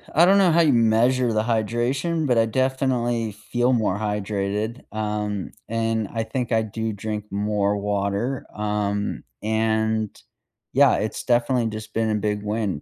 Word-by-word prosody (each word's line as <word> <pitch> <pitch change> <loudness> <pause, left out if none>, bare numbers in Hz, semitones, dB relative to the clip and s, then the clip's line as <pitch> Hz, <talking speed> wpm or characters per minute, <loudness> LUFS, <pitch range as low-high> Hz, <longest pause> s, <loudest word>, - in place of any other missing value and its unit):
I 170 - +7
don't 195 +2 +5
know 190 -3 +5
how 170 +1 +5
you 150 -5 +4
measure 120 +2 +3
the 110 0 +1
hydration, 120 +8 0
but 125 -3 +2
I 115 - +5
definitely 120 -2 0
feel 120 +4 0
more 105 -4 +1
hydrated, 105 +2 -2
um, 105 -2 -2 0.2
and 115 -1 -1
I 115 -1 -1
think 120 +1 -3
I 110 - +3
do 110 0 -3
drink 105 +1 -4
more 105 0 0
water, 100 +5 -1
um, 105 -1 -2 0.2
and 110 0 +1 0.6
yeah, - - +5
it's 105 +1 -3
definitely 120 -1 +2
just 110 0 -7
been 115 -1 +1
a 110 - +1
big 105 0 -1
win 105 -6 -2
110 Hz, 155 wpm, -23 LUFS, 105-120 Hz, 0.6 s, I